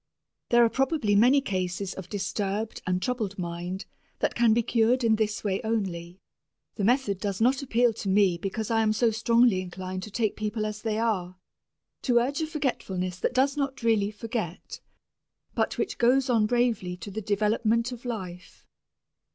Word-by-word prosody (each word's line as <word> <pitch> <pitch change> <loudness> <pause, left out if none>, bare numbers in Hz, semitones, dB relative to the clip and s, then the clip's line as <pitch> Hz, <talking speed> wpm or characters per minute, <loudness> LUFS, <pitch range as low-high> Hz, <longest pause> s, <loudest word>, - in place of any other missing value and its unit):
There 240 0 +6
are - - +2
probably 265 -5 +1
many 250 +7 +5
cases 185 -4 -3
of 185 -2 -9
disturbed 205 +2 -3
and 180 0 +1
troubled 225 -6 -2
mind 175 +2 -4 0.3
that - - 0
can 235 -2 +3
be 230 +2 +3
cured 235 +3 +2
in 225 -1 +4
this 215 -1 -1
way 195 -2 -1
only. 190 -5 -3 0.5
The 205 - -4
method 235 -3 +2
does 200 -1 -3
not 255 +4 +3
appeal 245 -3 +2
to 210 -2 -4
me 190 -3 +3
because 205 +4 -3
I 225 -1 +3
am 215 -1 +2
so 230 +1 +2
strongly 230 -2 +3
inclined 185 +1 -6
to 210 - -7
take 215 0 -1
people 215 0 -2
as 210 0 -5
they 215 -1 -1
are, 190 -6 -1 0.6
to 245 -3 +2
urge 270 +6 +1
a 315 - -1
forgetfulness 190 - -3
that - - -1
does 270 +2 +3
not 275 -3 -3
really 220 -3 +2
forget, 215 -4 -5 0.7
but - - -1
which - - -2
goes 255 +2 +3
on 220 -3 +3
bravely 230 -7 0
to 180 +3 -8
the 220 +3 -4
development 220 +3 +1
of 245 -1 -8
life. 185 -7 -7
215 Hz, 175 wpm, -27 LUFS, 190-240 Hz, 0.7 s, There